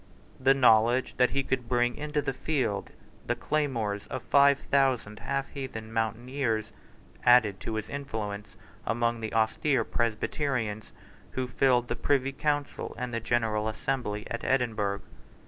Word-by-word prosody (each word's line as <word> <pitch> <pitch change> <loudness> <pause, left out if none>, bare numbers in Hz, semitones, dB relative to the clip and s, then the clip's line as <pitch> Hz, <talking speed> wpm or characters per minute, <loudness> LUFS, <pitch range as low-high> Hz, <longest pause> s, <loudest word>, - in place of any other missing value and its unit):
The 135 +1 +5
knowledge 120 -1 +4
that 125 -1 +4
he 140 0 0
could 125 -3 -2
bring 120 -1 +2
into 150 0 -2
the 135 - -1
field 130 -8 -1 0.4
the - - +1
claymores 115 -9 -1
of - - -5
five 140 0 +5
thousand 130 -6 +2
half 140 -1 -2
heathen 115 -5 -6
mountaineers 115 0 -1 0.5
added 110 -6 +5
to 110 - -4
his 110 0 -3
influence 110 -7 -5 0.3
among 115 +1 0
the 110 - -3
austere 115 +4 +2
Presbyterians 115 -1 -1 0.4
who 130 - -1
filled 125 -1 +2
the - - -2
Privy 135 -1 +1
Council 145 +1 -2
and 125 0 -4
the 115 - 0
General 110 -2 0
Assembly 110 -2 -2
at 115 - -3
Edinburgh. 110 -6 0
120 Hz, 140 wpm, -28 LUFS, 110-135 Hz, 0.5 s, The